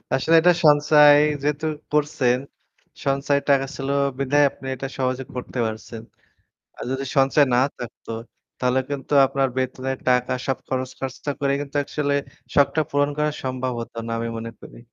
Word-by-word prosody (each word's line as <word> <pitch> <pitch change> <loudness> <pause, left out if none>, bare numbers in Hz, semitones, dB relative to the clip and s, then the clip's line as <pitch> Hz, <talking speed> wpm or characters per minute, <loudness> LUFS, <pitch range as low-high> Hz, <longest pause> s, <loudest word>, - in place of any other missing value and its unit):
আসলে 160 +5 +2
এটা 180 +1 +6
সঞ্চয় 150 0 +7 0.3
যেহেতু 150 +2 -1 0.3
করছেন, 145 -5 +2 0.7
সঞ্চয় 140 +1 +1
টাকা 135 -1 +4
ছিল 135 0 -4 0.3
বিদায় 145 +2 +3
আপনি 135 - -14
এটা 135 +1 -5
সহজে 130 0 -1
করতে 125 0 -5
পারছেন। 110 +1 -6 0.8
আর - - -7
যদি 135 +1 -2
সঞ্চয় 135 +2 +4
না 125 - +4 0.2
থাকতো 120 -1 -9 0.5
তাহলে 125 +1 +1
কিন্তু 140 +1 -5
আপনার 135 0 0
বেতনের 130 +1 -2
টাকা 125 0 +2
সব 135 - -1
খরচ 130 0 -2
খরচা 135 +2 -5
করে 140 -1 +1
কিন্তু 145 0 -6
আসলে 145 -1 -1 0.4
শখটা 145 +2 +3
পূরণ 145 0 +1
করা 150 0 +2
সম্ভব 130 0 -2
হত 115 - -8
না - - -3
আমি 115 0 -3
মনে 115 0 -6
করি। - - -13
135 Hz, 155 wpm, -23 LUFS, 130-145 Hz, 0.8 s, সঞ্চয়